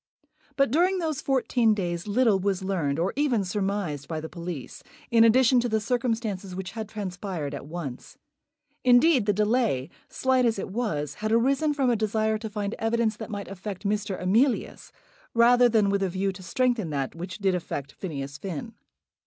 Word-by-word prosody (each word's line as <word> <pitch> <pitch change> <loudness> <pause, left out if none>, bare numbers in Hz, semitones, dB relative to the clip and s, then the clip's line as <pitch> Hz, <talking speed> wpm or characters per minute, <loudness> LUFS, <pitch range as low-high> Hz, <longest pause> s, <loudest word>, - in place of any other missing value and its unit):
But 275 -4 +2
during 360 +6 +3
those 315 -5 -2
fourteen 245 -4 +2
days 175 -2 -3
little 215 -2 +3
was 195 -1 -1
learned, 165 -7 -1
or 175 +4 0
even 265 -7 +1
surmised, 190 -7 -2
by 160 -2 -3
the 160 - -6
police, 170 -5 -7 0.3
in 230 -1 +6
addition 250 +2 +5
to 240 0 0
the 220 0 +1
circumstances 220 -5 -2
which 190 -1 -5
had 220 -2 -6
transpired 185 -7 -4
at 140 - -7
once. 150 -6 -7 0.7
Indeed 250 -1 +5
the - - +5
delay, 210 - +1 0.2
slight 260 -1 +2
as 230 -3 +2
it 195 - -5
was, 165 - -2
had 215 0 -1
arisen 275 +6 +2
from 265 -3 +2
a - - +2
desire 220 0 0
to 220 0 -5
find 205 0 -3
evidence 225 -1 +1
that 220 - -7
might 205 -2 -5
affect 195 0 -7
Mr. 205 -1 -1
Emilius, 225 +8 +1 0.4
rather 245 +1 +6
than 215 -3 +3
with 200 0 +1
a 195 - +1
view 190 +2 -1
to 190 0 -11
strengthen 230 +1 0
that 140 -3 -2
which 175 +2 -7
did 195 -2 +1
affect 145 -5 -4
Phineas 140 -6 -6
Finn. 190 +6 -5
210 Hz, 180 wpm, -26 LUFS, 180-235 Hz, 0.7 s, in